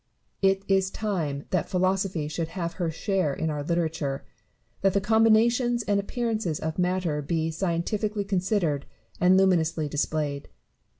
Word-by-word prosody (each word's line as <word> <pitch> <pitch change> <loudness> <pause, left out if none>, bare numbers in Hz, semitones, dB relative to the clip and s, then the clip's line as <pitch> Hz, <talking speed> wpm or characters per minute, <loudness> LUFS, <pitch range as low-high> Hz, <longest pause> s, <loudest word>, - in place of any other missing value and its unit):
It 195 0 +3
is 190 -1 +2
time 165 -11 -2
that 185 - 0
Philosophy 185 -4 0
should 160 +2 -3
have 170 -1 -2
her 170 - +1
share 165 -2 0
in 160 0 -1
our 150 -1 -3
literature; 160 -3 -2 0.6
that 195 -1 +3
the 200 - +3
combinations 225 +3 +3
and 205 -1 +1
appearances 215 -5 -2
of 160 +2 -3
matter 180 -4 0
be 160 +2 -1
scientifically 200 +5 -1
considered 185 -6 0 0.3
and 180 +1 +5
luminously 165 -5 +2
displayed. 145 -1 -2
180 Hz, 135 wpm, -26 LUFS, 160-200 Hz, 0.6 s, and